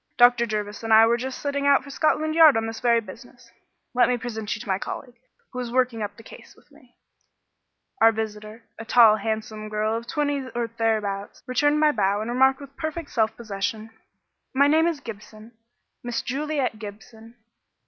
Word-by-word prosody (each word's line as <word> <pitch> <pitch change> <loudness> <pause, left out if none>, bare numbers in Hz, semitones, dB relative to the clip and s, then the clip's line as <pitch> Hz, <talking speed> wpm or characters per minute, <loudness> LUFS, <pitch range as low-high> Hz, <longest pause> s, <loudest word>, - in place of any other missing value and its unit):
"Dr. 245 -1 +5
Jervis 210 -1 -4
and 225 -1 -4
I 220 +1 +8
were 230 +1 +3
just 255 +2 -5
setting 280 0 -2
out 280 -1 +4
for 280 - -10
Scotland 310 +2 +1
Yard 315 -5 +7
on 225 - -1
this 225 0 -5
very 235 -1 +3
business. 215 - -14 0.4
Let 250 0 +4
me 250 - +1
present 220 -3 -4
you - - -9
to 235 - -10
my 190 -1 0
colleague, 250 +3 -7 0.4
who 250 - -6
is 245 -2 -4
working 250 -2 0
up 205 -1 -5
the 225 - -13
case - - -14
with - - -26
me." - - -22 1.1
Our 225 - +7
visitor, 215 0 -6 0.2
a - - -5
tall 225 -2 +6
handsome 215 0 -4
girl 215 +1 -1
of 230 +1 -5
twenty 285 -2 -2
or 235 -1 -2
thereabouts, 210 -3 -2
returned 290 +4 +1
my 305 0 +4
bow 205 -4 0
and 220 +3 -4
remarked 265 +2 +3
with 275 0 -12
perfect 315 -1 -5
self 220 -2 0
possession, 215 0 -4 0.6
"My 280 +1 +5
name 315 +3 +4
is 325 -4 -2
Gibson 215 -1 -11 0.5
Miss 240 -1 -3
Juliet 275 -4 -2
Gibson. 220 +2 -11
235 Hz, 190 wpm, -24 LUFS, 215-265 Hz, 1.1 s, I